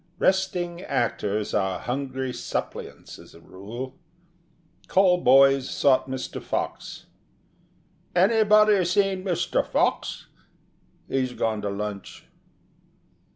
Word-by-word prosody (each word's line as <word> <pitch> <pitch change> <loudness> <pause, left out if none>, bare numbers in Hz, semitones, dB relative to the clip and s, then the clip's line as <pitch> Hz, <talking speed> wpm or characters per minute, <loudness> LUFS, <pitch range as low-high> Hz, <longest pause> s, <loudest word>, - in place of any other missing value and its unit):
Resting 180 -2 0
actors 110 - -2
are 95 -2 0
hungry 130 0 -4
suppliants - - -6
as - - -16
a - - -14
rule. 115 - -9 0.9
Call 185 -2 +4
boys 135 +1 +5
sought 135 -1 +2
Mr. 130 0 -5
Fox. - - -4 1.1
"Anybody 210 +1 +4
seen 190 +1 +1
Mr. 180 -4 0
Fox? - - -1 0.8
He's 130 -2 -1
gone 110 -3 -1
to 100 - -2
lunch." 100 0 -6
135 Hz, 95 wpm, -25 LUFS, 115-185 Hz, 1.1 s, boys